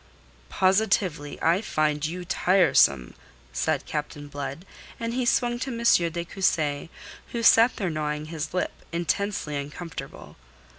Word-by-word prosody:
"Positively, 185 - +1
I 170 +4 +3
find 150 -7 0
you 175 +3 -3
tiresome," 175 - +3 0.4
said - - 0
Captain 150 -1 -5
Blood, 145 +4 -6 0.3
and 230 0 -3
he 250 0 0
swung 240 -1 +1
to 260 - -3
M. 230 -8 +3
de 170 +1 -4
Cussy, 160 -5 0 0.4
who 235 -1 -2
sat 230 +2 +6
there 190 -5 -2
gnawing 150 -1 -2
his 155 -1 -5
lip, 180 - -1 0.2
intensely 170 -1 -1
uncomfortable. 145 +4 -8
170 Hz, 130 wpm, -26 LUFS, 150-200 Hz, 0.4 s, sat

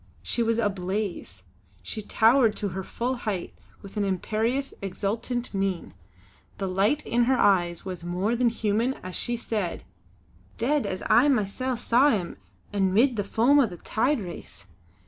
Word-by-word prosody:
She 235 - -1
was 230 0 +1
ablaze. 190 - -2 0.4
She 215 - -5
towered 225 +1 +4
to 205 - -2
her 190 +1 -4
full 250 +7 -2
height 205 -7 -3 0.3
with 200 +2 -10
an 205 - +1
imperious, 220 +8 -1
exultant 220 +6 -3
mien; 195 -2 -2 0.6
the 195 - -2
light 200 +11 +1
in 240 0 +2
her 260 +1 +3
eyes 175 -5 +2
was 185 -3 -6
more 180 +6 0
than 240 0 +3
human 225 +3 0
as 185 0 -6
she 240 -1 -2
said: 210 -6 -3 0.7
"Dead, 280 +5 +1
as 185 - -4
I 255 - +5
masel' 255 0 0
saw 245 +4 +4
him 190 -9 -1 0.4
an' 195 -2 +2
'mid 240 +6 +4
the 205 - -1
foam 240 +8 +3
o' 265 - +4
the 180 -4 -9
tide 250 - 0
race! 170 - -9
215 Hz, 160 wpm, -26 LUFS, 190-240 Hz, 0.7 s, I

